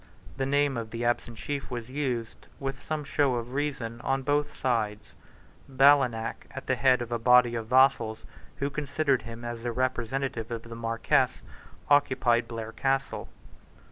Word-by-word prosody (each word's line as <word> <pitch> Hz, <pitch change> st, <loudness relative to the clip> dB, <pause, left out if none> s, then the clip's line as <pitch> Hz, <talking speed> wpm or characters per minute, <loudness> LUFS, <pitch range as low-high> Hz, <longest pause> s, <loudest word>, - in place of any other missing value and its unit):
The 135 Hz, -1 st, -1 dB
name 140 Hz, -1 st, +2 dB
of 115 Hz, -1 st, -4 dB
the 115 Hz, +1 st, -4 dB
absent 120 Hz, -1 st, -1 dB
chief 145 Hz, +3 st, -4 dB
was 120 Hz, -1 st, -6 dB
used, 125 Hz, -5 st, -3 dB
with 135 Hz, -1 st, -4 dB
some 155 Hz, -1 st, -3 dB
show 140 Hz, -2 st, +1 dB
of 120 Hz, +1 st, -4 dB
reason, 130 Hz, -5 st, -3 dB
on 135 Hz, 0 st, 0 dB
both 145 Hz, +1 st, 0 dB
sides. 110 Hz, -5 st, -1 dB, 0.6 s
Ballenach, 130 Hz, -4 st, +3 dB
at -, -, -8 dB
the -, -, +1 dB
head 130 Hz, -2 st, +3 dB
of 120 Hz, -, -10 dB
a 120 Hz, -, 0 dB
body 125 Hz, 0 st, +5 dB
of 115 Hz, -1 st, -3 dB
vassals 125 Hz, -3 st, +3 dB, 0.3 s
who 140 Hz, +1 st, -2 dB
considered 145 Hz, -1 st, 0 dB
him 115 Hz, +1 st, -9 dB
as 120 Hz, -1 st, -5 dB
the 120 Hz, 0 st, -2 dB
representative 130 Hz, 0 st, -2 dB
of 115 Hz, -1 st, -5 dB
the 115 Hz, 0 st, -9 dB
Marquess, 115 Hz, +3 st, +1 dB, 0.4 s
occupied 130 Hz, -4 st, +3 dB
Blair 115 Hz, -1 st, -6 dB
Castle. 135 Hz, +2 st, -1 dB
125 Hz, 160 wpm, -28 LUFS, 115-135 Hz, 0.6 s, body